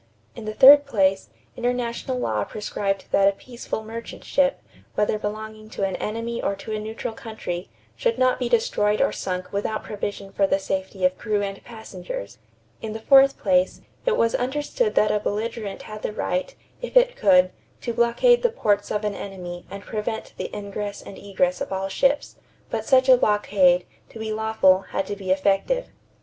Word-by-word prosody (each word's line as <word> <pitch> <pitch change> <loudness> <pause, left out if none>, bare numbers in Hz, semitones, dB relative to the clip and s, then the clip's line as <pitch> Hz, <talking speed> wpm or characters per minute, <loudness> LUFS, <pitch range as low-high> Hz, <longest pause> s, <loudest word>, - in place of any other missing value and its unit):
In 230 - -8
the 215 - -3
third 280 +3 +9
place, 195 -6 +1 0.3
international 245 +1 -2
law 110 - 0
prescribed 200 - -3
that 195 - +4
a 200 - +4
peaceful 235 0 -6
merchant 230 +1 -8
ship, 275 -1 +1 0.4
whether 210 0 +1
belonging 215 +1 -6
to 200 - -4
an 190 -1 0
enemy 230 +2 -3
or 200 - -1
to 195 +3 -8
a 215 - -2
neutral 220 +1 -5
country, 215 -6 -6 0.3
should 475 -1 0
not 255 0 +2
be 245 -2 -1
destroyed 215 -3 +2
or - - +3
sunk 185 0 -4
without 210 +2 -2
provision 200 -1 -5
for 195 0 +2
the 195 - +2
safety 190 -1 -2
of 185 0 +1
crew 210 -1 0
and 195 0 -5
passengers. 185 - -8 0.4
In 220 -1 -5
the 220 - -5
fourth 270 +3 +6
place, 185 -2 +1 0.2
it - - +1
was 230 0 +2
understood 295 - -1
that 210 0 +4
a 210 - +1
belligerent 210 0 -3
had 215 0 -8
the - - -2
right, - - -2 0.3
if - - 0
it - - +5
could, 185 - +4 0.3
to 235 - -3
blockade 235 - +4
the 485 - +3
ports 205 - 0
of 210 0 -2
an 210 - -1
enemy 180 -3 -7
and 200 0 -8
prevent 220 +1 -4
the - - -5
ingress 205 0 -5
and - - -10
egress 185 -3 -1
of - - -4
all 190 0 -2
ships; 275 +8 +1 0.3
but - - -2
such 260 -1 +4
a 255 -1 +8
blockade, 195 -5 +3 0.2
to - - -11
be 220 -1 -3
lawful, 220 -4 +3
had 195 - -3
to 205 - -4
be 195 -2 -7
effective. 195 - +1
215 Hz, 185 wpm, -24 LUFS, 195-235 Hz, 0.4 s, third